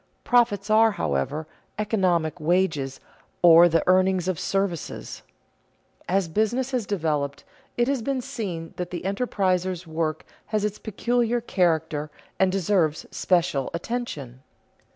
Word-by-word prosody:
Profits 220 -4 +2
are, 220 0 +5
however, 80 - -2 0.3
economic 185 -6 0
wages 155 -5 0 0.4
or 170 0 +8
the 165 -1 +2
earnings 185 0 +3
of 185 -4 -1
services. 195 -4 -3 0.9
As 190 -1 +2
business 220 +9 0
has 245 -6 -1
developed, 150 -7 -1 0.3
it 240 0 +2
has 275 -3 0
been 270 +3 -1
seen 210 -11 -5
that 180 - -3
the 180 - -5
enterpriser's 185 -4 -1
work 160 -1 -2 0.2
has 215 -1 0
its 210 0 -3
peculiar 240 +2 0
character 160 -8 0 0.3
and 190 -1 +4
deserves 180 -5 +1
special 170 -7 +1
attention. 170 - -5
185 Hz, 120 wpm, -25 LUFS, 160-215 Hz, 0.9 s, or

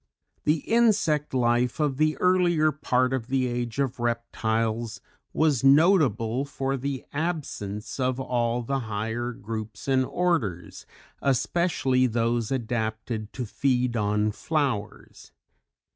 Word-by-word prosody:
_ - - -50
The 150 -1 +1
Insect 210 -11 +2
life 120 0 +1
of 145 -3 0
the 155 +1 +2
earlier 175 -4 +3
part 130 -3 +1
of 125 -3 -2
the 130 0 +1
Age 120 -1 -3
of 135 -3 -1
Reptiles 115 -1 -1 0.3
was 150 -5 +2
notable 135 - +4
for 135 -1 -2
the 135 0 -4
absence 140 - -4
of 130 0 0
all 120 -2 0
the 135 +3 -1
higher 110 +1 -3
groups 110 -1 -7
and 130 -1 +3
orders, 130 - -2 0.3
especially 135 -2 +1
those 115 -1 0
adapted 110 -3 -3
to 125 - -4
feed 125 +1 0
on 105 0 +1
flowers. 130 -5 -3
125 Hz, 120 wpm, -26 LUFS, 115-140 Hz, 0.3 s, notable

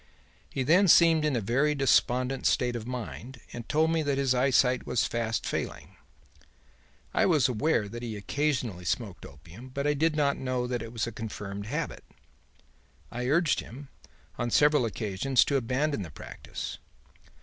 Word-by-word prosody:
He 135 - -2
then 175 +9 +4
seemed 165 -2 +6
in 150 -3 +1
a 120 - 0
very 135 +8 +1
despondent 130 -1 +2
state 125 -1 +1
of 115 -1 -5
mind 125 0 -6
and 120 -1 -8
told 160 +2 +2
me 165 -1 +1
that 145 -2 0
his 135 -2 +2
eyesight 125 0 +2
was 125 -2 +1
fast 115 -1 -2
failing. - - -4 1.2
I - - +3
was 155 -8 +4
aware 125 -2 +1
that 120 +3 -7
he 115 -3 -5
occasionally 125 -5 -2
smoked 100 +1 -3
opium, 85 - -13
but 140 +2 -4
I 150 - +3
did 155 +2 +1
not 145 -2 +1
know 130 -2 -2
that 125 -1 -2
it 115 0 -7
was 115 -2 -2
a 115 - -5
confirmed 105 -2 -6
habit. 150 +5 -4 1.1
I 125 +1 -3
urged 155 +2 +2
him, 135 +4 -10 0.5
on 120 - -1
several 150 0 +4
occasions, 110 +4 +1
to 140 - 0
abandon 135 +1 0
the 90 - -6
practice. 75 - -8
125 Hz, 165 wpm, -28 LUFS, 115-145 Hz, 1.2 s, seemed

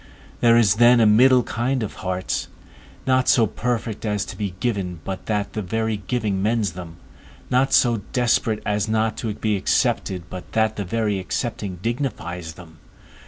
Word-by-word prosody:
There 115 -1 +5
is 105 -4 +4
then 120 +1 +6
a 115 - +5
middle 125 +4 +6
kind 125 +2 -1
of 105 - -5
hearts, 95 0 -3 0.6
not 130 -1 +2
so 120 -5 +5
perfect 115 0 -3
as 105 -2 -1
to - - -8
be 100 -4 -4
given 95 -8 -2
but 95 -1 -6
that 105 -2 -1
the 110 - -2
very 110 +3 -1
giving 105 -1 -2
mends 110 0 +1
them; 85 -2 -9 0.5
not 130 +2 +3
so 120 -4 +3
desperate 120 -3 +1
as 105 +1 0
not 110 0 +1
to 115 - -3
be 110 -1 0
accepted 95 -1 0
but 90 -1 -9
that 110 -1 +2
the 100 - -4
very 105 0 -1
accepting 100 -1 -4
dignifies 90 - -3
them. 80 -1 -15
110 Hz, 165 wpm, -22 LUFS, 95-120 Hz, 0.6 s, then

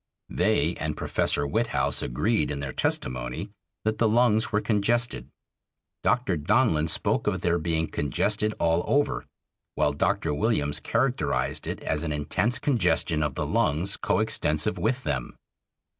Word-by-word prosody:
They 90 -4 +1
and 75 0 -3
Professor 75 - 0
Witthaus 110 +9 +1
agreed 75 - 0
in 70 -1 -3
their 70 -2 -4
testimony 65 - -2 0.3
that 110 0 0
the 115 - +3
lungs 110 -1 +3
were 105 - +2
congested. 115 +3 0 0.7
Dr. 125 -9 +1
Donlin 80 - +2
spoke - - 0
of - - 0
their 85 0 +1
being 80 0 0
"congested 105 - 0
all 85 +1 +1
over"; 145 +1 +1 0.5
while 75 - +2
Dr. 75 - 0
Williams 75 -6 0
characterized 75 - -1
it - - -4
as 75 -1 -1
"an 80 -2 -3
intense 90 +11 0
congestion 95 - +1
of 75 -3 -1
the - - -2
lungs 85 +7 0
coextensive 75 +8 +1
with 125 +4 0
them." 65 -4 -3
85 Hz, 140 wpm, -26 LUFS, 75-110 Hz, 0.7 s, the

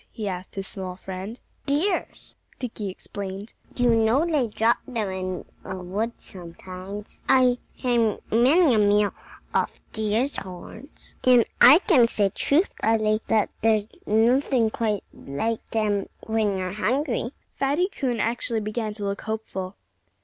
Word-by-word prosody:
he 215 -2 -5
asked 185 -1 -5
his 195 -1 -3
small 185 -2 -6
friend. 190 +5 -7 0.3
"Deer's!" 330 +7 -1 0.2
Dickie 220 -5 -4
explained. 195 +2 -7 0.2
"You 245 -1 +3
know 225 +7 +3
they 300 -8 +1
drop 225 +2 +2
them 225 -6 -2
in 185 -1 -4 0.2
the 190 - -5
woods 200 +6 -4
sometimes. 185 +3 -9
I've 255 -2 +5 0.2
had 235 -4 +1
many 265 +6 +5
a 220 - +4
meal 205 0 +3 0.4
off - - 0
deer's 220 +5 0
horns. 190 - -10
And 250 -2 +6 0.2
I 265 +5 +10
can 260 - +6
say 205 -3 +1
truthfully 220 - +1
that 220 -2 +2
there's 215 -2 +3 0.2
nothing 230 +1 +3
quite 215 -4 -1
like 220 +12 -3
them 210 -3 0
when 220 -3 0
you're 185 -1 -2
hungry." 240 +4 -1 0.2
Fatty 285 +7 +1
Coon 260 - -2
actually 230 0 -1
began 215 0 -3
to 210 - -5
look 200 0 -2
hopeful. 205 -4 -4
220 Hz, 135 wpm, -25 LUFS, 200-245 Hz, 0.4 s, I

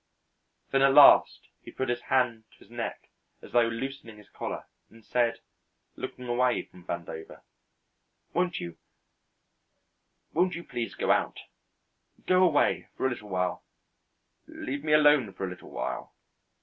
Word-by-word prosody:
Then 135 - +3
at 135 0 +5
last 145 - +7
he - - -12
put 130 - -3
his 120 0 -1
hand 120 -3 0
to - - -22
his 110 - -20
neck 120 -1 -6 0.3
as - - -12
though 120 -1 +4
loosening 115 -1 -6
his 105 - -17
collar - - -5 0.2
and 115 -1 -19
said, 120 -1 0 0.5
looking 125 -1 -7
away 125 +1 +1
from 90 - -17
Vandover: 85 -2 -7 0.9
"Won't 180 +1 0
you 85 -1 -7 1.6
won't 180 +1 +2
you 170 - -6
please 120 -6 -5
go - - +1
out - - 0 0.8
go 185 0 +4
away 170 -6 +3
for - - -1
a 130 - +2
little 105 -3 -7
while 90 -1 -1 0.8
leave 140 +2 -5
me 155 -1 +1
alone 150 -7 +5
for 95 - -4
a - - -4
little 90 - -11
while." - - -5
125 Hz, 150 wpm, -28 LUFS, 110-140 Hz, 1.6 s, last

